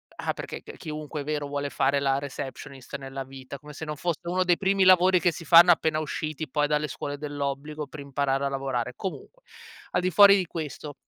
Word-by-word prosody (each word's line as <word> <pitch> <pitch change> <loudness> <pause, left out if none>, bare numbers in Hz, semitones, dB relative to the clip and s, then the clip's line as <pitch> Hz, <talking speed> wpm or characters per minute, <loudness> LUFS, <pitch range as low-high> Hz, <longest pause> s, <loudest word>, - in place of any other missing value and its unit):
Ah, - - -2
perché - - -7
c - - -10
chiunque, 155 -2 -6
è - - -5
vero, 150 -1 -2
vuole 145 0 -3
fare 140 +1 +1
la 135 -1 +1
receptionist 135 -1 -7
nella 135 0 -6
vita, 135 +1 -10
come 150 0 -12
se 160 - -7
non 150 0 -4
fosse 170 -2 -2
uno 180 +2 0
dei 175 -1 +3
primi 195 0 +2
lavori 185 0 +6
che 175 -1 +2
si 165 - -8
fanno 170 +3 +8
appena 160 -2 +2
usciti 155 0 -4
poi 150 +1 +1
dalle 150 0 0
scuole 145 +2 -5
dell'obbligo 145 +1 -4
per 150 - -10
imparare 140 0 -1
a - - 0
lavorare. 130 -3 -2
Comunque, - - -7 0.5
al 180 - +1
di 185 - +1
fuori 200 +3 +8
di 185 - 0
questo 150 -3 -6
150 Hz, 210 wpm, -26 LUFS, 140-170 Hz, 0.5 s, fanno